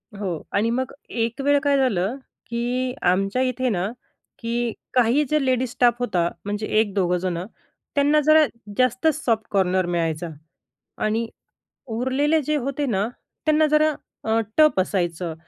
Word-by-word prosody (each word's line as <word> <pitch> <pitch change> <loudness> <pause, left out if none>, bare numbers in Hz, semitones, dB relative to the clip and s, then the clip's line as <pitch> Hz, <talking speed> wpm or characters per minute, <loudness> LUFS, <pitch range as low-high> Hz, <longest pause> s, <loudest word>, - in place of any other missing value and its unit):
हो 200 -2 -3 0.2
आणि 210 +3 +2
मग 260 +2 -1 0.2
एक 230 +2 -2
वेळ 285 +1 +4
काय 285 -1 +3
झालं 225 -5 +1 0.3
की 245 +2 -1
आमच्या 195 +7 +2
इथे 255 0 0
ना 185 -4 0 0.5
की 235 0 -1 0.2
काही 250 +4 +4
जे 305 -2 +2
लेडीज 255 -1 +1
स्टाफ 245 -1 +3
होता 180 -8 +1 0.2
म्हणजे 205 +1 -3
1-2 195 -4 +1
जणं, 175 -1 -2 0.5
त्यांना 290 +1 +4
जरा 310 0 +7 0.3
जास्तच 255 +5 +2
सॉफ्ट 225 -2 +1
कॉर्नर 185 -2 +2
मिळायचा 170 -1 -1 0.8
आणि 220 +2 0 0.7
उरलेले 280 +6 +2
जे 300 +2 0
होते 275 +1 -2
ना, 210 -3 0 0.4
त्यांना 310 0 +4
जरा 305 +1 +3 0.3
अ, 225 +1 +2 0.2
टफ 305 -10 +5
असायचं 175 -3 -1
235 Hz, 140 wpm, -23 LUFS, 195-270 Hz, 0.8 s, जरा